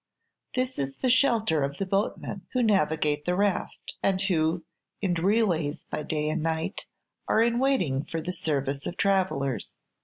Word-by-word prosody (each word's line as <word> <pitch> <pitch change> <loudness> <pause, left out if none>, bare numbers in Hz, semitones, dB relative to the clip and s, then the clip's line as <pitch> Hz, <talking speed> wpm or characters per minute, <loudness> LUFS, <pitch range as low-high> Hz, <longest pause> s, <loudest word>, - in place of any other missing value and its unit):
This 255 0 -1
is 135 -1 -2
the 255 - +1
shelter 230 - +3
of 140 +1 -3
the 195 - -1
boatmen 195 0 -1
who 255 -1 +2
navigate 155 -8 +2
the 180 - +1
raft, 200 0 -1
and 190 -1 +2
who, 170 -3 +1 0.4
in 190 -4 0
relays 175 -5 +1
by - - -2
day 150 0 -1
and 160 +1 -1
night, 160 0 -2 0.4
are 225 - +4
in 235 +1 +2
waiting 180 - +1
for 165 - -3
the 170 +3 -3
service 140 -4 -2
of 175 - -5
travellers. 185 - 0
175 Hz, 160 wpm, -27 LUFS, 150-205 Hz, 0.4 s, are